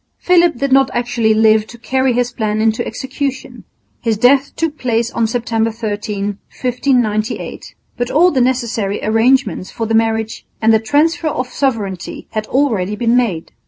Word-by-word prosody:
Philip 345 -5 +3
did 275 +2 -1
not 270 0 +4
actually 240 -2 +1
live 220 0 +4
to 235 - -12
carry 260 +2 0
his 245 0 0
plan 215 -2 -2
into 220 0 +1
execution. 265 +3 -5 0.4
His 225 -2 0
death 270 +5 +3
took 320 -2 -2
place 235 -1 0
on 230 -1 0
September 230 -1 -1
13, 205 -2 -4 0.2
1598. 245 -4 -1 0.2
But 245 0 -2
all 350 +4 +4
the 260 - +1
necessary 235 -5 0
arrangements 225 -1 +2
for 230 - -4
the 225 - -2
marriage 225 0 0 0.2
and 225 0 +4
the 220 - +4
transfer 305 +8 +1
of 255 -4 -2
sovereignty 220 -10 -3
had 215 0 -3
already 220 -8 0
been 230 +2 +1
made. 210 -10 0
235 Hz, 160 wpm, -16 LUFS, 220-260 Hz, 0.4 s, not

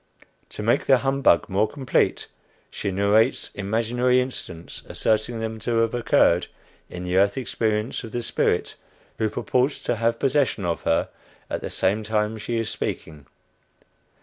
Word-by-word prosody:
To 105 - -7
make 115 +2 +2
the 135 - +6
humbug 135 -9 +2
more 100 +3 +1
complete, 135 -4 0 0.5
she - - -3
narrates 100 +3 +2
imaginary 115 +5 +1
incidents, 95 -10 -5
asserting 110 +2 0
them 110 0 -4
to 115 +1 -1
have 115 0 0
occurred 115 -7 +3 0.4
in 90 - -7
the 90 +1 0
earth 100 +3 +3
experience 110 -2 -1
of 115 - -8
the 120 +1 -3
spirit - - 0 0.5
who 110 - +1
purports 130 +6 0
to 120 - -1
have 115 +1 +1
possession 135 -7 +1
of 85 -1 -1
her 80 - +2 0.4
at - - -2
the - - -4
same 95 +3 0
time 110 0 -1
she 115 +2 -3
is 115 -1 -1
speaking. 75 -3 -5
110 Hz, 150 wpm, -24 LUFS, 100-120 Hz, 0.5 s, the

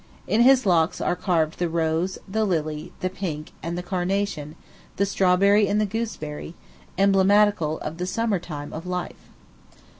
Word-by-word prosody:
In 215 +5 +2
his 260 0 +6
locks 170 -3 +2
are 175 - 0
carved 170 -3 0
the 175 -1 0
rose, 165 +2 0
the 220 +3 0
lily, 155 -3 -2
the 185 - 0
pink, 160 -6 -5
and 170 +2 -4
the 180 - -4
carnation, 180 -4 -2 0.4
the 200 - +1
strawberry 200 +2 +3
and 205 +2 +1
the 215 - +2
gooseberry 190 -8 -5 0.4
emblematical 195 -4 +3
of 155 +2 -5
the 180 - -2
summer 210 0 0
time 145 -4 -7
of 165 +3 -7
life. 180 -1 -5
180 Hz, 155 wpm, -24 LUFS, 160-200 Hz, 0.4 s, his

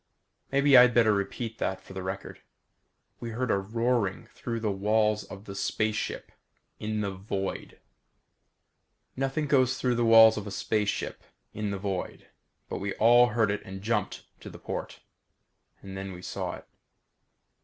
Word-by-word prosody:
Maybe 140 0 +4
I'd 125 -1 +8
better 110 -3 +5
repeat 105 +3 -3
that 95 0 -1
for 95 0 -13
the 95 - -5
record. 95 +1 -6 0.8
We 120 - -5
heard 125 +3 -2
a - - +3
roaring 115 0 -1
through 115 -1 -4
the 110 -2 -1
walls 105 +2 +1
of 100 +1 -11
the 100 - -7
space 105 +2 -1
ship. - - -4 0.5
In 110 0 -2
the 100 -2 -2
void. 95 0 -5 1.4
Nothing 135 +3 -1
goes 130 -3 +3
through 125 -1 +1
the 120 0 +1
walls 115 -1 +8
of 105 0 -5
a - - -4
space 105 +1 -1
ship - - -4 0.3
in 105 -1 -3
the 100 - -3
void 95 -1 -4 0.4
but - - -4
we 100 0 -3
all 120 +2 +6
heard 110 -2 +1
it 105 - -2
and 95 0 -9
jumped 105 -3 -1 0.2
to - - -9
the - - -11
port. - - -6 0.8
And 95 -1 -8
we 95 -1 -6
all 90 - -13
saw - - -4
it. - - -14
105 Hz, 165 wpm, -28 LUFS, 100-115 Hz, 1.4 s, I'd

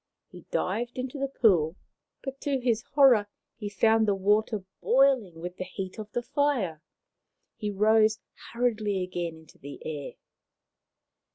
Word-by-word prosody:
He - - -13
dived 235 +7 -2
into 255 +2 -4
the 275 - 0
pool, 185 - +3 0.5
but 270 0 -6
to 280 -2 0
his 235 -3 +1
horror 255 -8 +6 0.3
he 210 -2 -5
found 220 +2 +3
the 200 - +3
water 210 +1 +1 0.2
boiling 255 -10 +3
with 180 +2 -6
the - - -3
heat 190 +2 -7
of 210 -1 -7
the 240 - -2
fire. 245 - 0 0.7
He 210 - -3
rose 215 +2 +4 0.3
hurriedly 215 -5 0
again 175 -2 -4
into 160 -1 -18
the 140 +1 -9
air. 150 -3 -5
215 Hz, 145 wpm, -28 LUFS, 185-245 Hz, 0.7 s, horror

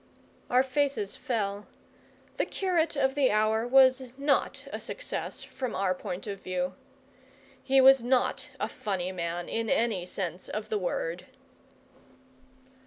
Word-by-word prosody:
Our 250 +1 +5
faces 265 -6 -1
fell. 205 -4 -2 0.7
The - - +1
curate 350 -5 0
of 265 -1 +2
the 280 -2 +3
hour 215 +2 +2
was 260 0 +5
not 280 0 +1
a - - -3
success, - - -4
from 255 -4 -5
our 190 -1 +1
point 180 0 -6
of 200 -2 -6
view. 185 0 -2 0.9
He 270 0 +3
was 265 -1 +8
not 250 +1 +1
a - - 0
funny 185 -3 -3
man, 175 -1 -3
in 225 -1 -2
any 215 -6 +1
sense 180 -1 -5
of 215 0 -4
the 215 -1 0
word. 175 -1 -3
220 Hz, 135 wpm, -29 LUFS, 185-265 Hz, 0.9 s, was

